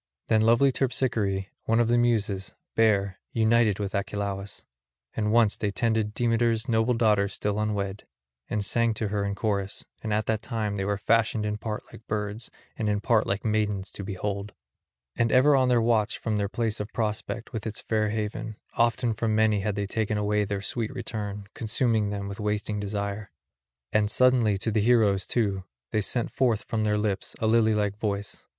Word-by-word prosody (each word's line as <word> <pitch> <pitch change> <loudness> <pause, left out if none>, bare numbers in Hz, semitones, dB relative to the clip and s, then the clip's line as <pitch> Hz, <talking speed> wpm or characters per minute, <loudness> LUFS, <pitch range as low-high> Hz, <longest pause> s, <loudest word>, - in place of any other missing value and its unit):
Them 110 -1 +4
lovely 115 +5 +5
Terpsichore, 115 -7 0 0.2
one 115 +1 +2
of 120 - +3
the 120 - +3
Muses, 110 -5 +1 0.2
bare, 100 -4 +2
united 110 -2 +3
with 100 -2 -3
Achelous; 100 0 -3 0.5
and 105 -1 0
once 115 -2 +4
they 105 - -1
tended 110 +1 0
Demeter's 115 0 +1
noble 115 +1 +2
daughter 105 -3 +3
still 105 +1 -2
unwed, 105 -2 -2 0.4
and 105 -2 -1
sang 115 0 +1
to 110 -1 -2
her 100 0 -1
in 100 0 -2
chorus; 100 -2 -2 0.2
and 110 - -4
at 105 0 +1
that 110 -1 0
time 110 -4 -2
they 95 - -1
were 100 0 0
fashioned 110 +1 +2
in 105 0 -2
part 105 -1 -4
like 115 - -13
birds 105 +2 -3 0.3
and 110 -2 -1
in 105 0 +1
part 110 0 +2
like 100 +3 -2
maidens 105 -3 0
to 100 - -7
behold. 100 +1 -4 0.6
And 115 -1 +1
ever 140 +3 +6
on 130 -1 +3
the 125 -1 +4
watch 115 -2 +2
from 110 -2 -1
their 100 -1 -1
place 115 0 -1
of 105 +1 -5
prospect 115 +3 -3
with 110 -1 -4
its 110 - -3
fair 110 -1 0
haven, 110 +1 -3 0.2
often 115 0 +2
from 110 0 0
many 110 -1 +3
had 100 0 -1
they 100 -1 -1
taken 110 +1 -1
away 105 0 +1
their 100 0 -3
sweet 115 +1 -2
return, 105 -4 -4
consuming 110 -2 +1
them 100 -1 -4
with 100 +1 -7
wasting 105 0 -1
desire; 100 0 -3 0.6
and 105 -1 +3
suddenly 120 -4 +3
to 110 +4 -1
the 110 0 +2
heroes, 105 -4 +3
too, 100 -5 0 0.3
they 110 - +1
sent 120 +3 -1
forth 120 -5 +1
from 110 -1 -1
their 105 0 +2
lips 105 -2 -2
a - - -2
lily 110 -1 +4
like 105 -1 -1
voice. 100 -2 -3
105 Hz, 185 wpm, -27 LUFS, 100-115 Hz, 0.6 s, ever